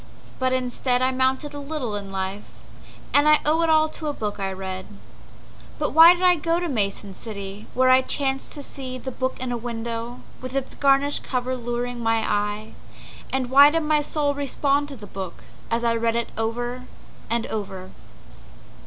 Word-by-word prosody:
But 260 Hz, 0 st, +1 dB
instead 250 Hz, 0 st, 0 dB
I 260 Hz, -, +3 dB
mounted 260 Hz, +3 st, 0 dB
a 290 Hz, -, -6 dB
little 280 Hz, -6 st, -4 dB
in 200 Hz, -1 st, -6 dB
life, 195 Hz, +1 st, -5 dB, 0.6 s
And 290 Hz, +1 st, +5 dB
I 305 Hz, -, +6 dB
owe 315 Hz, +2 st, +3 dB
it 330 Hz, -, +2 dB
all 315 Hz, 0 st, +5 dB
to 310 Hz, 0 st, -6 dB
a 295 Hz, -, -1 dB
book 210 Hz, -5 st, -4 dB
I 195 Hz, -1 st, -1 dB
read. 190 Hz, 0 st, -5 dB, 0.9 s
But -, -, -1 dB
why 330 Hz, +2 st, +9 dB
did 360 Hz, -, -5 dB
I 360 Hz, -1 st, +6 dB
go 330 Hz, +2 st, 0 dB
to 350 Hz, -, -2 dB
Mason 200 Hz, -, -2 dB
City, 200 Hz, 0 st, -7 dB
Where 255 Hz, 0 st, +5 dB
I 260 Hz, 0 st, +7 dB
chanced 270 Hz, 0 st, -1 dB
to 290 Hz, -, -7 dB
see 260 Hz, -2 st, -6 dB
the 260 Hz, +1 st, -6 dB
book 260 Hz, +1 st, -3 dB
in 255 Hz, -1 st, -3 dB
a 240 Hz, -, -1 dB
window, 235 Hz, 0 st, -5 dB, 0.2 s
With 255 Hz, +1 st, -6 dB
its 270 Hz, -1 st, -2 dB
garish 280 Hz, +1 st, +3 dB
cover 255 Hz, 0 st, -2 dB
luring 240 Hz, 0 st, -3 dB
my 225 Hz, -1 st, +1 dB
eye? 210 Hz, +1 st, -1 dB, 0.6 s
And 260 Hz, -2 st, -1 dB
why 280 Hz, +2 st, +9 dB
did 330 Hz, +2 st, 0 dB
my 300 Hz, 0 st, +2 dB
soul 290 Hz, -1 st, 0 dB
respond 285 Hz, 0 st, 0 dB
to 285 Hz, -, -8 dB
the 215 Hz, -4 st, -10 dB
book, 190 Hz, -3 st, -7 dB, 0.3 s
As 230 Hz, +1 st, 0 dB
I 235 Hz, -1 st, +3 dB
read 230 Hz, 0 st, +1 dB
it 235 Hz, 0 st, -1 dB
over 240 Hz, +3 st, -3 dB, 0.4 s
and 230 Hz, 0 st, 0 dB
over? 190 Hz, -3 st, -5 dB
255 Hz, 190 wpm, -24 LUFS, 225-285 Hz, 0.9 s, why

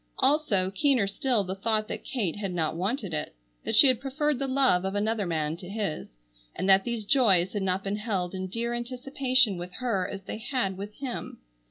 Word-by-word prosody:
Also, 260 Hz, -10 st, +2 dB
keener 245 Hz, +2 st, +2 dB
still 215 Hz, +2 st, +1 dB
the 185 Hz, 0 st, -4 dB
thought 215 Hz, +2 st, 0 dB
that -, -, -6 dB
Kate 220 Hz, -, -2 dB
had 200 Hz, -2 st, -3 dB
not 160 Hz, -2 st, 0 dB
wanted 195 Hz, +1 st, -2 dB
it: 150 Hz, -, -3 dB, 0.3 s
that -, -, -1 dB
she 250 Hz, -, +9 dB
had 255 Hz, -4 st, +4 dB
preferred 280 Hz, +1 st, -1 dB
the 275 Hz, -, -1 dB
love 260 Hz, -9 st, +3 dB
of 190 Hz, +1 st, -2 dB
another 210 Hz, -1 st, 0 dB
man 155 Hz, -2 st, -1 dB
to 180 Hz, 0 st, -9 dB
his, 200 Hz, -6 st, -3 dB, 0.5 s
and 190 Hz, -, -2 dB
that 195 Hz, 0 st, +6 dB
these 235 Hz, -3 st, -3 dB
joys 200 Hz, -8 st, +4 dB
had 205 Hz, -, -2 dB
not 190 Hz, 0 st, 0 dB
been 200 Hz, +1 st, -2 dB
held 195 Hz, -5 st, -2 dB
in 185 Hz, 0 st, -4 dB
dear 230 Hz, +5 st, -2 dB
anticipation 255 Hz, -2 st, +1 dB
with 180 Hz, +1 st, -7 dB
her 225 Hz, -8 st, -1 dB
as 195 Hz, -1 st, -7 dB
they 215 Hz, -, -6 dB
had 225 Hz, -5 st, -1 dB
with 205 Hz, +2 st, -7 dB
him. 260 Hz, -3 st, -5 dB
210 Hz, 205 wpm, -27 LUFS, 190-250 Hz, 0.5 s, she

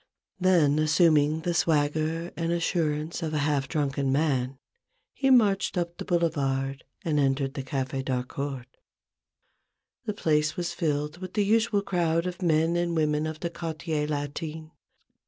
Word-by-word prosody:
Then 170 Hz, -6 st, +4 dB
assuming 155 Hz, -1 st, +3 dB
the 175 Hz, +1 st, -1 dB
swagger 160 Hz, +1 st, +1 dB
and 165 Hz, 0 st, -1 dB
assurance 165 Hz, -2 st, -1 dB
of 155 Hz, -2 st, -2 dB
a 145 Hz, -1 st, +1 dB
half 145 Hz, -2 st, 0 dB
drunken 140 Hz, -2 st, -1 dB
man, 135 Hz, -3 st, 0 dB, 0.6 s
he 270 Hz, -, +1 dB
marched 205 Hz, -7 st, +3 dB
up 170 Hz, -1 st, -2 dB
the -, -, -5 dB
Boulevard 140 Hz, -6 st, 0 dB, 0.2 s
and 155 Hz, -3 st, +1 dB
entered 135 Hz, -1 st, +1 dB
the 145 Hz, -, -4 dB
Cafe 135 Hz, 0 st, -3 dB
d'Harcourt. 130 Hz, 0 st, -4 dB, 1.3 s
The 210 Hz, -2 st, -2 dB
place 150 Hz, -4 st, +1 dB
was 175 Hz, -1 st, -2 dB
filled 150 Hz, 0 st, -2 dB
with 185 Hz, +1 st, -8 dB
the 205 Hz, -2 st, +2 dB
usual 220 Hz, -1 st, +2 dB
crowd 170 Hz, -3 st, 0 dB
of 180 Hz, +1 st, -5 dB
men 165 Hz, -1 st, +2 dB
and 175 Hz, -1 st, 0 dB
women 155 Hz, -1 st, +1 dB
of 155 Hz, 0 st, -6 dB
the 170 Hz, -, -2 dB
Quartier 160 Hz, -2 st, -3 dB
Latin. 150 Hz, +2 st, -4 dB
155 Hz, 145 wpm, -27 LUFS, 145-170 Hz, 1.3 s, Then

